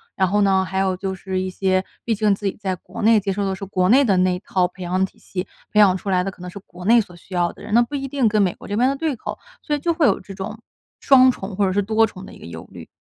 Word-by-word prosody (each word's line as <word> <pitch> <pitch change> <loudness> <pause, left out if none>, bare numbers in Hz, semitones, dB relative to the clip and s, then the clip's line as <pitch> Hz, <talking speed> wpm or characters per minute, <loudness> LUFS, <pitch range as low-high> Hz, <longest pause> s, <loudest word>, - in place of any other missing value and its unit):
然 190 - +2
后 205 +3 +1
呢， 190 -1 +3
还 190 +1 -3
有 190 -1 0
就 190 0 -3
是 190 0 -4
一 185 - -2
些， 185 0 0 0.2
毕 225 -2 0
竟 210 -1 +2
自 200 +1 -3
己 195 - -3
在 190 -3 -2
国 195 - -8
内 225 0 +5
接 195 -1 -2
受 200 +1 -2
的 190 - -1
是 195 - -9
国 185 -2 0
内 270 +4 +6
的 195 -6 +2
那 185 0 +3
一 180 - -4
套 185 -2 0
培 185 +1 -15
养 185 +2 0
体 - - -15
系， 185 0 -5 0.2
培 210 - +2
养 190 -3 +6
出 195 +1 -5
来 180 -1 +2
的 195 - -3
可 180 - -17
能 180 - -6
是 180 - -10
国 180 +1 -12
内 235 +3 +6
所 180 -5 -5
需 180 +2 -11
要 175 -1 +1
的 - - -16
人， - - -9
那 240 - +6
不 240 - -10
一 275 -1 -2
定 270 -3 +1
跟 215 0 +2
美 185 -3 +1
国 - - -13
这 205 - -3
边 250 +4 +3
的 275 - -1
对 305 -2 -2
口， - - -6 0.2
所 295 - -1
以 290 - -3
就 335 +3 0
会 320 -4 +3
有 200 - +2
这 195 +1 -11
种 195 +3 -6 0.4
双 260 -2 +6
重 195 -5 -4
或 200 0 +2
者 - - 0
是 200 +2 +1
多 220 +2 +2
重 185 -2 -11
的 - - -12
一 - - -14
个 - - -11
忧 80 0 -9
虑。 85 -4 -11
195 Hz, 350 characters per minute, -21 LUFS, 185-220 Hz, 0.4 s, 内